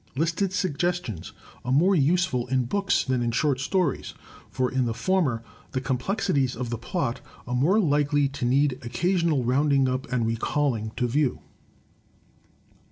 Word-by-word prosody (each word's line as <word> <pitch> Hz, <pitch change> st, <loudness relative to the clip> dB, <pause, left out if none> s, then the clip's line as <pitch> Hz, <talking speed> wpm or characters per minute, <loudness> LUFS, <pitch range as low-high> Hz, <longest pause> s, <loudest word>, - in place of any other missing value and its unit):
Listed 165 Hz, +6 st, 0 dB
suggestions 175 Hz, -, -2 dB, 0.3 s
are 125 Hz, -, -3 dB
more 170 Hz, +9 st, +4 dB
useful 155 Hz, -5 st, +2 dB
in 130 Hz, 0 st, +1 dB
books 200 Hz, +9 st, +1 dB
than 130 Hz, -2 st, 0 dB
in 120 Hz, -, 0 dB
short 135 Hz, +3 st, +1 dB
stories; 150 Hz, +1 st, -1 dB, 0.3 s
for 130 Hz, -1 st, -1 dB
in 130 Hz, -1 st, +1 dB
the 115 Hz, -1 st, -2 dB
former 155 Hz, -12 st, 0 dB, 0.3 s
the 130 Hz, -, 0 dB
complexities 135 Hz, -, 0 dB
of 120 Hz, 0 st, -4 dB
the 120 Hz, -, -2 dB
plot 130 Hz, 0 st, -2 dB, 0.2 s
are 125 Hz, -, -4 dB
more 155 Hz, -, +3 dB
likely 145 Hz, -4 st, +2 dB
to 140 Hz, -1 st, -7 dB
need 135 Hz, +2 st, +2 dB
occasional 165 Hz, +3 st, 0 dB
rounding 135 Hz, +2 st, +2 dB
up 130 Hz, 0 st, -3 dB
and 125 Hz, -2 st, +1 dB
recalling 115 Hz, 0 st, -1 dB
to 125 Hz, 0 st, +1 dB
view. 135 Hz, +2 st, 0 dB
135 Hz, 150 wpm, -25 LUFS, 125-165 Hz, 0.3 s, more